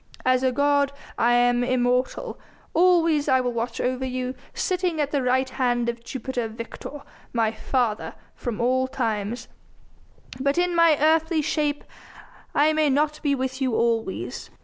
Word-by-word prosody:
As 255 0 +3
a 260 -1 +2
god 285 +1 +2 0.2
I 240 +1 +3
am 245 0 +3
immortal; 250 0 0 0.3
always 335 -4 +3
I 260 - +5
will 250 -1 -1
watch 230 0 -3
over 255 +1 -1
you, 255 0 -3 0.2
sitting 360 -3 -1
at 290 -1 0
the 285 - +1
right 260 +1 +2
hand 245 -2 0
of 235 0 -5
Jupiter 245 -1 -3
Victor, 230 +5 -8 0.3
my 225 -2 +2
father, 225 -1 -1 0.2
from 240 -4 -5
all 260 +2 +2
times. 225 -3 -2 0.9
But 280 +3 +1
in 355 0 +2
my 335 -3 +5
earthly 320 +1 +3
shape 295 -1 -1 0.7
I 305 +2 +4
may 310 -1 +2
not 300 +2 +1
be 285 -2 +1
with 260 0 -3
you 255 -4 +1
always. 225 - -1
260 Hz, 150 wpm, -24 LUFS, 240-295 Hz, 0.9 s, I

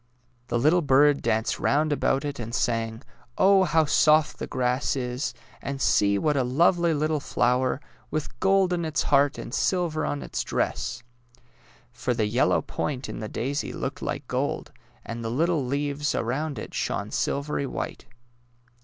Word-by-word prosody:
The 120 - 0
little 155 +8 +4
bird 145 0 +4
danced 110 +1 0
round 150 +1 +2
about 140 0 +1
it 145 -2 -4
and 115 0 -4
sang, 115 0 -1 0.2
" - - -26
Oh, 190 0 +5
how 160 -2 +3
soft 155 +1 +3
the - - -4
grass 125 +2 0
is! 125 +1 -2 0.3
And 140 0 -4
see 100 -5 +3
what 150 +7 +1
a 135 - +2
lovely 170 +6 +3
little 155 0 0
flower, 125 0 +1 0.3
with 150 -5 -4
gold 195 -1 +3
in 170 -1 -1
its 155 -2 -1
heart 140 +1 +3
and - - -7
silver 175 -4 0
on 70 -2 -2
its 65 - -3
dress! - - -2 0.5
" 115 +1 -33 0.3
For 125 0 -2
the 110 -2 +1
yellow 120 +5 +2
point 135 -3 -3
in - - -6
the 110 -1 -5
daisy 140 +5 -2
looked - - -4
like - - -4
gold, - - -2 0.3
and 115 0 -5
the 115 - -2
little 160 +4 +1
leaves 145 +3 -1
around 140 +4 -2
it - - -7
shone - - -2
silvery 140 0 -1
white. - - -5
140 Hz, 170 wpm, -26 LUFS, 125-155 Hz, 0.5 s, Oh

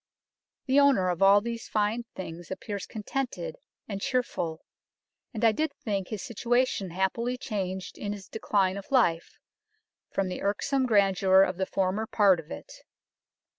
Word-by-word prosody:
" - - -64
The 270 +1 +4
owner 270 -10 +4
of 175 0 -2
all 200 +1 +7
these 230 +1 -5
fine 215 +3 0
things 170 -2 -7
appears 200 0 -5
contented 270 - -4 0.3
and 200 -2 -5
chearfull, 175 -11 -1 0.7
and 225 0 -1
I 225 - +7
did 310 +6 -1
think 200 -4 -3
his 215 - -5
Situation 240 -4 0
happily 190 +8 -1
changed 190 -6 -4
in 205 - -3
his 200 -2 -7
decline 200 -3 0
of 200 - -9
life, 175 -11 +2 0.7
from 195 - -1
the 185 - -5
irksome 255 +7 0
Grandeur 195 -3 +5
of 185 -2 -1
the 190 0 -1
former 195 +3 0
part 200 -6 +4
of 155 - -11
it. - - -9
205 Hz, 155 wpm, -28 LUFS, 190-235 Hz, 0.7 s, all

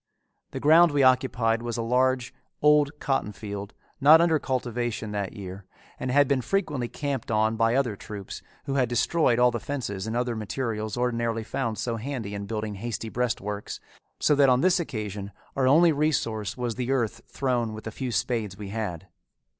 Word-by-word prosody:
The - - -5
ground 165 +4 +6
we 145 -2 +2
occupied 125 -3 +3
was 120 0 -3
a 115 - -1
large 125 +1 +1 0.3
old 150 -1 +5
cottonfield 105 -6 -3 0.3
not 150 +3 +8
under 165 -2 +3
cultivation 120 -4 -2
that 100 -2 -3
year, 100 -2 -8 0.4
and 130 - -3
had 140 +2 +4
been 135 -1 +1
frequently 145 - -1
camped 140 -2 -4
on 110 0 +2
by 115 +1 +2
other 130 -6 +1
troops 100 -1 -8 0.2
who 135 - -2
had 130 -4 +2
destroyed 120 +1 +2
all 125 0 +5
the 120 - -3
fences 110 -7 -4
and 110 +2 -2
other 120 -1 -1
materials 110 0 -3
ordinarily 115 -2 0
found 115 -1 -3
so 115 -2 -2
handy 115 -4 -4
in 100 0 -5
building 110 -1 -3
hasty 115 -1 -4
breastworks, 105 -4 -3 0.4
so - - +3
that 140 -2 +5
on 125 0 +4
this 185 +2 +4
occasion 105 - -4 0.2
our 130 -1 +2
only 165 +5 +6
resource 130 -9 -1
was 120 -2 -2
the 125 +2 -4
earth 115 -4 0
thrown 125 -4 -1
with 110 0 -8
the 110 - -5
few 130 +2 -4
spades 110 -4 -1
we 100 -2 -7
had. 100 -6 -4
120 Hz, 180 wpm, -26 LUFS, 110-135 Hz, 0.4 s, not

